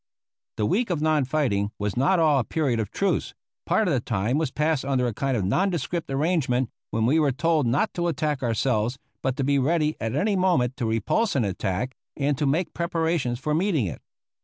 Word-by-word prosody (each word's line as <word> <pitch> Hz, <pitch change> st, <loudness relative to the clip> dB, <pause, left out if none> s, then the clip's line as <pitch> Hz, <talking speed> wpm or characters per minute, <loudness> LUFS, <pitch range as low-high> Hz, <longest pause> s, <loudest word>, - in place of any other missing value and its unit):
The 105 Hz, -, +1 dB
week 225 Hz, -, +1 dB
of 175 Hz, -4 st, 0 dB
non 155 Hz, -2 st, +2 dB
fighting 125 Hz, -8 st, 0 dB
was 105 Hz, -1 st, -2 dB
not 140 Hz, +9 st, +3 dB
all 155 Hz, -4 st, +4 dB
a -, -, +1 dB
period 135 Hz, -4 st, 0 dB
of 105 Hz, -3 st, -2 dB
truce; 200 Hz, -, -1 dB, 0.3 s
part 220 Hz, -, +2 dB
of 170 Hz, -, +2 dB
the 130 Hz, -, +2 dB
time 115 Hz, +4 st, -1 dB
was 160 Hz, -, 0 dB
passed 150 Hz, 0 st, 0 dB
under 135 Hz, -2 st, +1 dB
a 120 Hz, -, -1 dB
kind 135 Hz, +2 st, -1 dB
of 100 Hz, -, -1 dB
nondescript 170 Hz, -, -1 dB
arrangement, 135 Hz, -4 st, 0 dB, 0.2 s
when 110 Hz, +1 st, 0 dB
we 145 Hz, +7 st, +3 dB
were 145 Hz, -3 st, +3 dB
told 155 Hz, 0 st, +1 dB
not 140 Hz, -, +1 dB
to 175 Hz, 0 st, -1 dB
attack 150 Hz, -3 st, -1 dB
ourselves, 120 Hz, 0 st, 0 dB, 0.2 s
but 130 Hz, -1 st, -1 dB
to 140 Hz, -, 0 dB
be 140 Hz, +1 st, +2 dB
ready 155 Hz, +2 st, +1 dB
at 115 Hz, +2 st, -2 dB
any 200 Hz, +7 st, +1 dB
moment 170 Hz, -10 st, +2 dB
to 115 Hz, -, -1 dB
repulse 115 Hz, -, 0 dB
an 125 Hz, -5 st, +2 dB
attack 95 Hz, +5 st, -2 dB, 0.2 s
and 145 Hz, 0 st, +1 dB
to 150 Hz, -, +1 dB
make 160 Hz, +4 st, 0 dB
preparations 165 Hz, -7 st, -1 dB
for 150 Hz, +4 st, -2 dB
meeting 165 Hz, -, +1 dB
it. 90 Hz, -, -6 dB
140 Hz, 210 wpm, -25 LUFS, 120-160 Hz, 0.3 s, all